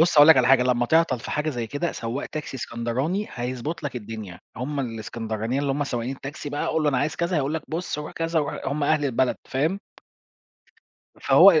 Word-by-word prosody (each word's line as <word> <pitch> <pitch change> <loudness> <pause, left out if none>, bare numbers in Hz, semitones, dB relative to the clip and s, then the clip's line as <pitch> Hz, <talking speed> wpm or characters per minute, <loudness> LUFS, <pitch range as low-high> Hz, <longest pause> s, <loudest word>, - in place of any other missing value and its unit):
بُص 165 -2 +4
هاقول 145 +2 +9
لك 160 - +9
على 125 -2 +4
حاجة، 130 -1 +6
لما 125 -1 +2
تعطل 160 -4 +3
في - - -7
حاجة 150 +1 0
زي 120 -5 -3
كده، 145 +7 -2
سواق 115 +4 -4
تاكسي 150 -3 -5
إسكندراني 130 - -2
هيضبط 125 +6 -4
لك 140 -3 -3
الدنيا. 105 -6 -7 0.2
هُم 140 +4 -2
الإسكندرانيين 115 0 -3
اللي 140 - +1
هُم 145 +1 0
سواقين 125 +1 -3
التاكسي 145 +2 -7
بقى، 145 - -2
قُل 160 -1 +1
له: 150 - +3
"أنا 135 -3 +2
عايز 150 +2 -1
كذا" 175 +1 0
هيقول 145 +1 0
لك: 160 - -2
"بُص 165 -2 -3
روح 150 - -6
كذا، 165 0 0
روح-" 145 -2 -2
هُم 145 +2 0
أهل 150 -1 +2
البلد، 130 -1 +1
فاهم؟ 160 +9 0 1.4
فهو - - +7
140 Hz, 205 wpm, -25 LUFS, 120-155 Hz, 1.4 s, هاقول